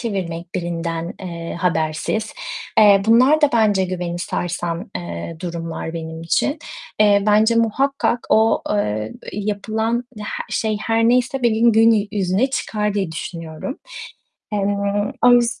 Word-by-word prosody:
çevirmek 180 Hz, -7 st, -4 dB
birinden, 170 Hz, -1 st, -3 dB
eee, 170 Hz, -3 st, -6 dB
habersiz. 165 Hz, +5 st, -1 dB, 0.5 s
Eee, 200 Hz, -2 st, +7 dB
bunlar 255 Hz, +7 st, +5 dB
da 295 Hz, -, +4 dB
bence 210 Hz, -5 st, +3 dB
güveni 175 Hz, -1 st, -3 dB
sarsan, 175 Hz, +2 st, -3 dB
eee, 85 Hz, -, -6 dB
durumlar 165 Hz, -2 st, -5 dB
benim 160 Hz, 0 st, -6 dB
için. 280 Hz, -, 0 dB, 0.4 s
Eee, 205 Hz, -1 st, +5 dB
bence 215 Hz, +2 st, +4 dB
muhakkak 245 Hz, +2 st, +1 dB
o, 220 Hz, +1 st, +4 dB
eee, 110 Hz, -, -1 dB, 0.2 s
eee, 210 Hz, -, -4 dB
yapılan 220 Hz, +3 st, -1 dB
ya 210 Hz, -1 st, -7 dB, 0.2 s
şey 215 Hz, -2 st, -1 dB
her 225 Hz, 0 st, +1 dB
neyse 250 Hz, +1 st, +1 dB
benim 230 Hz, 0 st, +4 dB
gün 220 Hz, -2 st, +4 dB
yüzüne 200 Hz, +5 st, +1 dB
çıkar 210 Hz, -5 st, -2 dB
diye 190 Hz, -5 st, -1 dB
düşünüyorum. 165 Hz, -, -6 dB, 0.7 s
Eee, 210 Hz, -, 0 dB, 0.7 s
o -, -, +8 dB
yüz 240 Hz, 0 st, +3 dB
205 Hz, 130 wpm, -20 LUFS, 170-225 Hz, 0.7 s, o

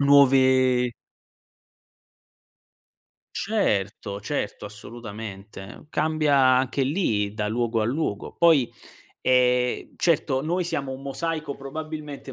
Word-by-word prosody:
nuove 130 Hz, -3 st, +5 dB, 2.4 s
Certo, 105 Hz, -, -1 dB
certo, 110 Hz, 0 st, -4 dB
assolutamente. 105 Hz, +1 st, -9 dB
Cambia 155 Hz, -3 st, +1 dB
anche 130 Hz, +1 st, +3 dB
lì 115 Hz, -, 0 dB
da 105 Hz, -1 st, -2 dB
luogo 115 Hz, 0 st, 0 dB
a -, -, +1 dB
luogo. 120 Hz, -4 st, -2 dB
Poi, 160 Hz, -8 st, +4 dB, 0.5 s
ehm, 125 Hz, -1 st, +2 dB
certo 145 Hz, -5 st, +1 dB
noi 175 Hz, +3 st, -1 dB
siamo 140 Hz, -5 st, -3 dB
un 130 Hz, -, -7 dB
mosaico 155 Hz, +1 st, -3 dB
probabilmente 150 Hz, -1 st, -7 dB
130 Hz, 95 wpm, -25 LUFS, 115-150 Hz, 2.4 s, nuove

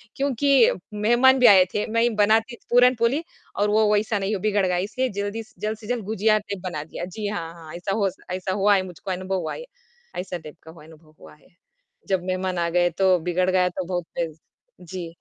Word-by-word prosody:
क्योंकि 280 Hz, -1 st, 0 dB, 0.4 s
मेहमान 240 Hz, +5 st, +4 dB
भी 250 Hz, -, +4 dB
आए 190 Hz, -2 st, +8 dB
थे। 210 Hz, -, -1 dB
मैं 230 Hz, 0 st, +2 dB
ही 240 Hz, -, +3 dB
बनाती 220 Hz, +4 st, +3 dB
पूरनपोली 245 Hz, +4 st, +3 dB, 0.3 s
और 205 Hz, +1 st, +2 dB
वो 215 Hz, 0 st, +3 dB
वैसा 210 Hz, 0 st, +1 dB
नहीं 200 Hz, +2 st, -1 dB
वो -, -, -3 dB
बिगड़ 205 Hz, -2 st, +1 dB
गया 180 Hz, -1 st, 0 dB
इसलिए 245 Hz, +8 st, -1 dB
जल्दी 205 Hz, +3 st, -3 dB
स -, -, -24 dB
जल्द 215 Hz, +1 st, -3 dB
से 215 Hz, -1 st, -12 dB
जल्द 245 Hz, -3 st, -2 dB
गुझिया 215 Hz, +1 st, +2 dB
टाइप 200 Hz, -2 st, -7 dB
बना 175 Hz, -5 st, -4 dB
दिया। 160 Hz, +2 st, -7 dB
जी 215 Hz, -2 st, -3 dB
हाँ, 165 Hz, -5 st, -4 dB
हाँ, 165 Hz, -1 st, -12 dB
ऐसा 195 Hz, +3 st, -3 dB
होस 190 Hz, -1 st, -1 dB
ऐसा 185 Hz, +1 st, -2 dB
हुआ 205 Hz, +1 st, +5 dB
है, 190 Hz, -, +2 dB
मुझको 180 Hz, +2 st, -7 dB
अनुभव 185 Hz, +1 st, -2 dB
हुआ 160 Hz, -, -4 dB
है। -, -, -8 dB, 0.5 s
ऐसा 180 Hz, -1 st, -4 dB
टाइप 155 Hz, -2 st, -12 dB
का 160 Hz, -, -12 dB
हुआ 165 Hz, -, -15 dB
अनुभव 155 Hz, -1 st, -18 dB
हुआ -, -, -14 dB
है। 150 Hz, -, -25 dB, 0.6 s
जब 190 Hz, -2 st, +1 dB
मेहमान 185 Hz, 0 st, -2 dB
आ 170 Hz, -, 0 dB
गए 175 Hz, 0 st, +4 dB
तो 185 Hz, -1 st, +5 dB
बिगड़ 180 Hz, +1 st, +1 dB
गया 180 Hz, -1 st, +3 dB
तो 180 Hz, +1 st, -5 dB
बहुत 175 Hz, -1 st, -3 dB
पिज़ 165 Hz, -2 st, -3 dB, 0.6 s
जी। 180 Hz, -2 st, -4 dB
195 Hz, 220 wpm, -23 LUFS, 180-220 Hz, 0.6 s, आए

